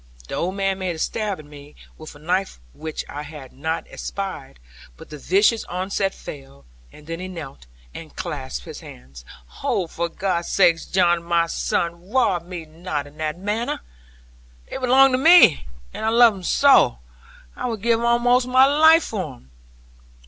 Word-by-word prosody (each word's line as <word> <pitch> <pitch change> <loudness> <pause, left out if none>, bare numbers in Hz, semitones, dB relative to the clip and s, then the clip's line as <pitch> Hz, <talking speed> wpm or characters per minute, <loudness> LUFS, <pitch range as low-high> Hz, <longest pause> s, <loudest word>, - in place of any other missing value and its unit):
The - - -8
old 185 +3 -2
man 195 -1 -1
made 185 -2 -2
a - - -9
stab 205 +4 -2
at 155 - -12
me, 145 0 -14 0.2
with 155 -1 -11
a - - -12
knife 180 - -2
which 155 - -6
I 145 - -6
had 145 -3 -11
not 160 +4 -3
espied; 190 - -6 0.4
but - - -14
the 150 - -8
vicious 205 - +2
onset 190 +2 -2
failed; 135 - -11 0.3
and 150 - -16
then 165 +1 -6
he 185 - -6
knelt, 150 - -9 0.3
and - - -11
clasped 65 -2 -5
his - - -9
hands. 65 0 -13 0.4
'Oh, 185 - 0
for 170 +1 -4
God's 175 -1 -2
sake, 170 -4 +4
John, 175 -2 +3
my 170 0 +1
son, 170 +1 -3
rob 200 -9 +1
me 175 -3 -7
not 155 -2 -5
in 145 +1 -16
that 155 0 -3
manner. 210 +5 -3 0.9
They - - -4
belong 265 +1 +5
to 255 - +1
me; 320 - +6 0.3
and - - -6
I 220 - +2
love 235 0 +6
them 195 - -10
so; 270 - +4 0.6
I - - -4
would 225 -4 -5
give 230 -1 +2
almost 245 +1 +3
my 255 +1 +6
life 315 +3 +5
for 185 - -5
them. 65 - -23
180 Hz, 175 wpm, -22 LUFS, 155-220 Hz, 0.9 s, me